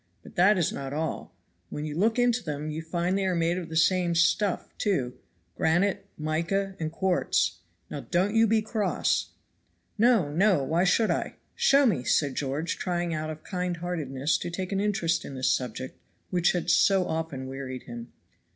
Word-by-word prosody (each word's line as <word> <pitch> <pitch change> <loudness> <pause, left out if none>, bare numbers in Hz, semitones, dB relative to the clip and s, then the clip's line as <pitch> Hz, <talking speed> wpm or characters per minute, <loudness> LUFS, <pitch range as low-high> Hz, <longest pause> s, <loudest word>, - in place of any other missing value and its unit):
But - - -13
that 195 +3 +4
is 170 - +1
not 135 0 -5
all; 160 +2 -3 0.4
when 150 - -5
you 150 -1 -5
look 220 +7 +2
into 245 -1 +2
them 150 0 -4
you 155 +1 -4
find 175 +3 -1
they 195 -1 0
are 185 - +1
made 170 +1 +1
of 170 - -7
the 160 - -6
same 175 +1 +3
stuff, 185 +3 +1
too 135 - 0 0.4
granite, 180 +5 +1
mica 170 +6 -1
and 155 -1 -2
quartz. 185 +2 +1 0.3
Now - - -6
don't 190 +4 +1
you 225 0 +5
be 220 0 +2
cross." 215 -1 0 0.7
"No! 225 -10 +4
no! 185 -3 +3
why 165 +7 +1
should 215 +4 +3
I? - - -2 0.2
Show 280 +1 +4
me," 175 - +1
said 140 +3 +1
George, 145 +5 -2
trying 175 -1 -1
out 155 0 -3
of 155 0 -7
kindheartedness 170 -6 -2
to - - -4
take 185 +2 -4
an 195 - 0
interest 200 -5 0
in 135 - -8
this 130 0 +1
subject, 130 +1 -4 0.3
which 175 -1 +2
had 175 -2 0
so 195 -2 +4
often 160 -6 -3
wearied 130 -1 -6
him. 120 0 -9
170 Hz, 180 wpm, -27 LUFS, 150-195 Hz, 0.7 s, you